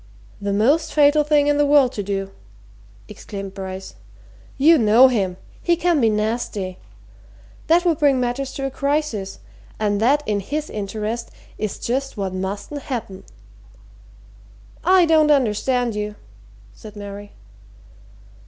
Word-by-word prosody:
"The 200 0 -2
most 260 +11 +2
fatal 295 0 +5
thing 295 -1 +3
in 290 0 +2
the 290 - +4
world 280 -3 +5
to 210 - -4
do!" 195 -1 -3 0.8
exclaimed 195 -2 -8
Bryce. 190 -1 -7 0.6
"You 310 +3 +5
know 230 +4 +6
him 195 -7 -1 0.2
he 345 - +2
can 340 -3 +1
be 225 - +4
nasty. 210 -3 -2 0.9
That 345 +2 +3
would 335 -3 +2
bring 280 -3 +3
matters 250 +2 -2
to 275 - -4
a 270 - -3
crisis. 280 -9 -2 0.4
And 205 -1 0
that, 285 +6 +3
in 210 -1 0
his 295 +10 -4
interest, 215 +3 -4 0.3
is 215 -2 -3
just 265 +1 -3
what 195 -2 -3
mustn't 200 +9 -5
happen." 220 -9 -6 1.6
"I 370 -1 +5
don't 315 -2 +4
understand 245 -2 +1
you," 210 0 -4 0.6
said 215 -1 -13
Mary. 205 0 -9
235 Hz, 135 wpm, -21 LUFS, 205-290 Hz, 1.6 s, know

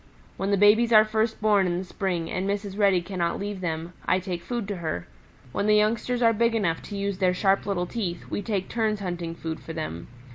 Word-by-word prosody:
When 195 +1 -2
the 200 - +3
babies 215 +4 +5
are 215 -1 +8
first 220 +1 0
born 205 -3 +4
in 175 -1 0
the 185 - -3
spring 180 -3 -2
and 190 +2 -1
Mrs. 200 -1 -3
Reddy 195 -4 +3
cannot 175 -2 -2
leave 200 -1 -4
them, 165 0 -3
I 185 - +2
take 180 -2 -4
food 235 0 -4
to 200 - -3
her. 155 - -3 0.5
When 200 - -1
the 210 - +5
youngsters 230 +3 +1
are 230 0 +5
big 230 +1 +2
enough 175 -7 0
to 205 - -5
use 200 -1 -2
their 180 -2 +2
sharp 195 +1 +2
little 185 -3 0
teeth, 180 -4 -4
we - - -3
take 195 -2 -2
turns 220 -3 -1
hunting 175 -3 -4
food 160 -1 -5
for 160 - -8
them. 120 - -5
195 Hz, 225 wpm, -26 LUFS, 175-215 Hz, 0.5 s, are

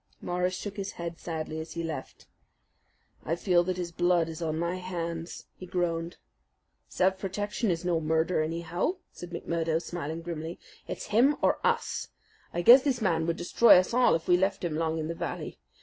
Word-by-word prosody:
Morris 180 +1 -1
shook 205 +2 -6
his 195 -1 -4
head 170 -1 -6
sadly 160 -1 -4
as 160 +1 -7
he 170 - -3
left. 155 -5 -6 1.0
"I 165 - -1
feel 175 -1 +3
that 185 0 -2
his 175 -1 -3
blood 175 -1 +2
is 160 +1 -7
on 160 -1 -1
my 170 +2 -1
hands," 170 -2 -5
he 185 - -10
groaned. 170 -1 -2 0.7
"Self 190 +1 +1
protection 205 +3 -2
is 170 0 -1
no 175 -2 +2
murder, 160 +2 +1
anyhow," 170 - -1 0.2
said 175 - -9
McMurdo, 165 -1 -1
smiling 165 -1 -5
grimly. 165 0 -5 0.3
"It's - - -6
him 265 +7 +5
or - - +3
us. 470 0 0 0.4
I 175 - -2
guess 250 +7 +10
this 265 -3 0
man 170 -6 +1
would 170 - 0
destroy 180 +6 +6
us 185 +4 +1
all 250 -6 +5
if 165 - -4
we 180 - +5
left 190 +1 0
him 170 -3 -1
long 160 0 0
in 155 -1 -2
the 165 - -2
valley. - - -5
175 Hz, 185 wpm, -28 LUFS, 165-185 Hz, 1.0 s, guess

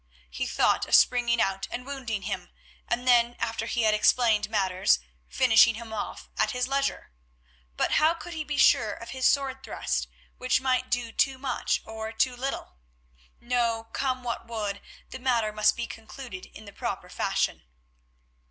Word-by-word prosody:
He 65 - -3
thought - - +2
of - - +5
springing 240 -1 +4
out 195 -2 0
and 250 +1 -6
wounding 250 -7 -4
him, - - -4 0.4
and 245 +2 -2
then, 240 -1 +4
after 225 0 -3
he 235 -1 0
had 215 -1 +4
explained 215 -1 +3
matters, 190 - +2 0.3
finishing 225 - +5
him 225 -1 -8
off 215 - -5
at - - +3
his 250 -1 -1
leisure. 275 - -1 0.7
But - - +1
how 315 +2 +4
could 345 +1 -9
he 315 -1 -3
be 295 -1 -4
sure 220 -5 +5
of 230 - -9
his 260 -1 +2
sword 270 -1 +1
thrust, - - -2 0.3
which 255 +1 +2
might 255 -1 0
do 240 -1 -1
too 265 +3 +1
much 260 -2 -1
or 220 0 -6
too 250 +3 +1
little? 255 - -5 0.6
No, 235 -2 -1
come 255 -2 -1
what 235 -1 -4
would, 210 -3 -4 0.3
the - - -7
matter 240 -4 +1
must 210 0 +3
be 235 - -2
concluded 225 -3 -9
in 215 - -13
the 200 - -11
proper - - -4
fashion. - - -1
235 Hz, 170 wpm, -27 LUFS, 220-255 Hz, 0.7 s, of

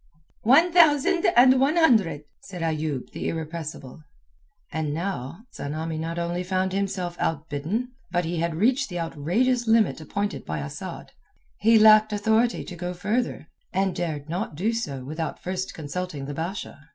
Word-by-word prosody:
"One 310 +10 +6
thousand 335 +1 +5
and 255 +1 +7
one 275 +4 +3
hundred," 220 - +3 0.2
said 180 -11 -7
Ayoub 155 -4 -2
the - - -3
irrepressible 160 -3 -6 0.7
And 155 -1 -2
now 170 - -4
Tsamanni 155 +2 -4
not 165 +1 -4
only 175 +1 -2
found 185 0 -1
himself 185 -3 -2
outbidden, 160 - -2 0.2
but 175 0 0
he 170 +1 -2
had 170 -1 -1
reached 250 - +2
the 175 -1 -4
outrageous 220 - 0
limit 225 -7 +3
appointed 200 +6 -3
by 80 - -4
Asad. 75 0 -7 0.5
He 225 +2 +5
lacked 215 0 +7
authority 220 +3 +1
to 180 - -8
go 180 +1 -4
further, 210 +2 -1 0.3
dared 175 -6 -1
not 180 +3 -3
do 210 +9 0
so 140 - -3
without 155 +3 -4
first 185 +1 -3
consulting 155 -1 -5
the 145 - -5
Basha. 170 +5 -5
180 Hz, 150 wpm, -25 LUFS, 160-220 Hz, 0.7 s, and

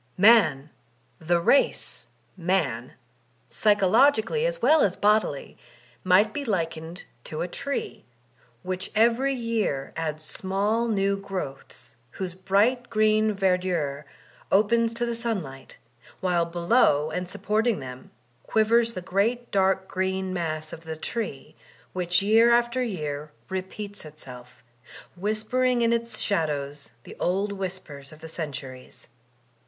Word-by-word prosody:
Man, 170 -9 +5 0.5
the 170 +2 +1
race 225 +11 +1 0.3
Man, 165 -10 -1 0.5
psychologically 220 - +3
as - - -3
well 315 -8 +5
as 190 -2 +2
bodily, 210 -9 +1 0.4
might 195 +4 +4
be 290 - -3
likened 165 -5 -3 0.2
to 155 +1 -5
a - - -3
tree, 280 +9 -4 0.6
which 185 0 -4
every 235 +5 +3
year 225 - -2
adds 155 -1 -3
small 205 +7 0
new 200 -2 +1
growths 140 -10 -7 0.2
whose 185 -2 -4
bright 210 +7 +1
green 215 0 +2
verdure 180 -7 0 0.5
opens 230 +3 +3
to 240 0 0
the 235 - -2
sun 230 -5 -2
light, 135 -1 -12 0.4
while 175 -2 +1
below 170 - +2
and 180 +2 -3
supporting 220 +1 0
them 130 -1 -9 0.3
quivers 230 +1 +2
the 185 - -6
great 225 +7 0
daric 190 -1 +2
green 190 0 -2
mass 155 -3 -3
of 165 - -9
the 160 -1 -6
tree, 205 - -5 0.4
which 180 0 +1
year 225 +3 +5
after 240 +1 +2
year 155 -10 -3 0.2
re 190 0 -1
peats 205 +2 -7
itself, 125 -6 -13 0.5
whispering 225 +6 0
in 230 0 +3
its 235 0 -2
shadows 145 - -2
the - - -11
old 195 +3 0
whispers 185 -8 -6
of 155 - -13
the 160 - -9
centuries. 135 -7 -7
190 Hz, 125 wpm, -26 LUFS, 160-225 Hz, 0.6 s, Man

